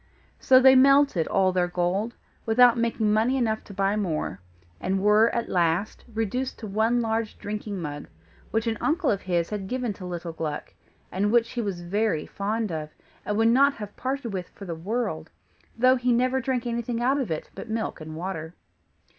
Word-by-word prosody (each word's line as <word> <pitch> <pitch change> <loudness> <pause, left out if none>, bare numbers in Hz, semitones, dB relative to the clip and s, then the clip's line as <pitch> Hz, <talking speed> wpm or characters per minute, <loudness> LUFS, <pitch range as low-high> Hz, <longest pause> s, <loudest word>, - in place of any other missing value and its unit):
So 255 -1 +6
they 265 0 +7
melted 275 - +5
all 190 -1 +2
their 180 -1 +1
gold, 180 +6 -1 0.3
without 240 +1 +6
making 230 -2 +1
money 230 +5 +2
enough 220 -3 0
to 200 - -11
buy 195 +1 +1
more, 165 - -2 0.4
and 190 +1 -1
were 210 +3 +5
at 235 - -2
last 175 +3 0
reduced 225 +4 -2
to 225 - -8
one 220 +4 +1
large 225 -1 -2
drinking 210 -1 -5
mug, 145 -3 -6 0.4
which 225 +1 0
an 225 -1 -1
uncle 320 0 +1
of 200 - -1
his 175 -1 -1
had 200 -2 -4
given 250 -1 -2
to 185 -1 -10
little 175 -1 -5
Gluck, 155 -2 -5 0.4
and 200 +3 0
which 235 0 +3
he 240 - -2
was 195 -5 -3
very 200 -2 0
fond 215 +1 -2
of, 155 -2 -4 0.4
and 210 - 0
would 225 +1 +4
not 275 +4 +4
have 210 -2 -8
parted 260 -4 -3
with 185 -2 -4
for 200 - -11
the 170 - -4
world; 165 -2 -3 0.5
though 255 +2 +5
he 250 0 +1
never 255 +2 +2
drank 255 -1 -1
anything 235 0 -2
out 265 +4 +2
of 255 -8 -2
it 160 -1 -4
but - - -9
milk 220 -6 -3
and 155 0 -7
water. 165 -1 -5
215 Hz, 190 wpm, -26 LUFS, 185-240 Hz, 0.5 s, they